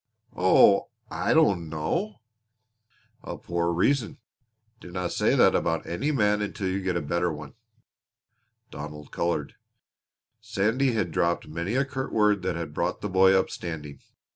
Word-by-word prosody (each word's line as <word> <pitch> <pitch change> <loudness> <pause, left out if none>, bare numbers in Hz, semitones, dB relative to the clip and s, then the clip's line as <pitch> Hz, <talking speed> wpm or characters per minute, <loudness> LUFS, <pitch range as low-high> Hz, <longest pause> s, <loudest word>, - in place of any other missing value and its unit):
"Oh, - - +5 0.2
I - - -1
don't 85 -5 +3
know." 115 - -3 1.0
"A - - -7
poor 85 0 -1
reason. 110 +7 +1 0.6
Dinna 90 0 -4
say - - +2
that - - +5
about 80 0 0
any 135 - -2
man 105 -6 +2
until 100 -1 -3
you 95 +1 -2
get 95 -2 -1
a 85 - -3
better 85 +3 0
one." 75 -2 -8 1.2
Donald 75 0 -8
colored. 85 -4 -2 0.8
Sandy 115 +6 0
had 100 -6 -1
dropped 85 0 0
many 85 +8 -3
a 135 +1 +2
curt 130 -1 -5
word 105 -2 +3
that 95 -2 -2
had 85 -3 -5
brought - - -2
the 105 - -3
boy 95 +1 +5
up, - - -2
standing. 75 -4 -6
90 Hz, 145 wpm, -26 LUFS, 85-105 Hz, 1.2 s, Oh